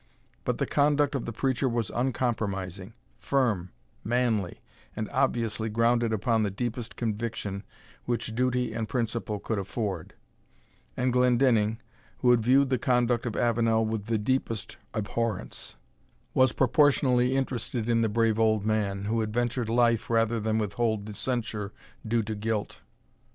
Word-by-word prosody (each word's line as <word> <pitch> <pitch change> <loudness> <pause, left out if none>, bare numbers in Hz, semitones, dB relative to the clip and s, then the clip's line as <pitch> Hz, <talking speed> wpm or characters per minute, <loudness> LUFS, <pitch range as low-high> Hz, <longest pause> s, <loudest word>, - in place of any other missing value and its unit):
But - - 0
the - - 0
conduct 145 0 +2
of 135 - -2
the - - -3
preacher 130 +2 0
was 115 -2 -1
uncompromising, 105 -6 -2 0.3
firm, 115 -10 0 0.3
manly, 115 -5 0 0.4
and 110 - -3
obviously 115 -4 0
grounded 115 +1 +2
upon 110 +1 +1
the 105 - +1
deepest 120 +3 -4
conviction 110 -3 -3 0.4
which 120 -2 -2
duty 125 +1 0
and 110 -2 -3
principle 115 -3 -2
could 105 +1 -2
afford; 95 -3 -4 0.8
and 125 0 +1
Glendinning, 120 -3 +3 0.4
who 125 - +4
had 120 -2 +4
viewed 135 +4 +4
the 130 - +2
conduct 125 -2 +1
of 115 - -3
Avenel 115 -1 +2
with 110 -1 -3
the 115 -1 +1
deepest 115 0 -2 0.2
abhorrence, 110 -1 -2 0.6
was 130 -2 +4
proportionally 130 -1 +3
interested 125 -3 -2
in 115 -1 +3
the 110 - +2
brave 115 0 +2
old 110 -2 +2
man, 100 -2 0
who 115 +2 0
had 110 -1 -1
ventured 120 0 -1
life 120 0 +2
rather 115 0 +2
than 110 0 0
withhold 110 0 0
the 105 - -7
censure 110 -3 -2 0.4
due 115 0 +1
to 110 +1 -4
guilt. 105 0 -3
115 Hz, 145 wpm, -28 LUFS, 110-125 Hz, 0.8 s, who